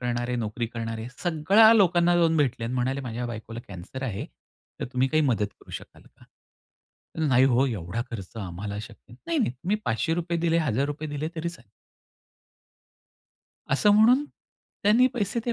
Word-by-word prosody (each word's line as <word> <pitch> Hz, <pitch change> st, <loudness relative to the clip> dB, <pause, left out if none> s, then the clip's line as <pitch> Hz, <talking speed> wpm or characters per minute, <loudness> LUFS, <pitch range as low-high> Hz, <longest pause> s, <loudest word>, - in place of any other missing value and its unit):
करणारे, 120 Hz, 0 st, -2 dB
नोकरी 115 Hz, 0 st, -2 dB
करणारे 115 Hz, 0 st, -5 dB
सगळ्या 190 Hz, +7 st, +5 dB
लोकांना 175 Hz, -4 st, +4 dB
जाऊन 165 Hz, -1 st, +3 dB
भेटले 130 Hz, -6 st, +1 dB
आणि 120 Hz, +2 st, -3 dB
म्हणाले 130 Hz, +2 st, -1 dB
माझ्या 120 Hz, -1 st, -4 dB
बायकोला 115 Hz, 0 st, -7 dB
कॅन्सर 100 Hz, +7 st, -8 dB
आहे. 105 Hz, -7 st, -4 dB, 0.5 s
तर -, -, -1 dB
तुम्ही 130 Hz, 0 st, +2 dB
काही 155 Hz, +2 st, +2 dB
मदत 115 Hz, -7 st, +1 dB
करू -, -, -16 dB
शकाल -, -, -9 dB
का? -, -, -22 dB, 1.0 s
"नाही 130 Hz, -1 st, +5 dB
हो 130 Hz, 0 st, +3 dB
एवढा 110 Hz, -2 st, -3 dB
खर्च 105 Hz, -2 st, -8 dB
आम्हाला 100 Hz, +2 st, -5 dB
शक्य 115 Hz, +1 st, -13 dB
नाही." 120 Hz, -, -15 dB
नाही, 335 Hz, -1 st, 0 dB
नाही 245 Hz, -, +2 dB
तुम्ही 175 Hz, +11 st, -2 dB
₹500 165 Hz, +9 st, -1 dB
दिले, 165 Hz, 0 st, +2 dB
₹1,000 145 Hz, +2 st, -1 dB
दिले 145 Hz, +1 st, -3 dB
तरी 160 Hz, +1 st, -2 dB
चालेल. 120 Hz, -, -12 dB, 2.0 s
असं 140 Hz, +10 st, +4 dB
म्हणून 240 Hz, +7 st, +5 dB, 0.6 s
त्यांनी 225 Hz, +5 st, +5 dB
पैसे 225 Hz, 0 st, -1 dB
ते 240 Hz, -, +1 dB
130 Hz, 160 wpm, -26 LUFS, 115-170 Hz, 2.0 s, सगळ्या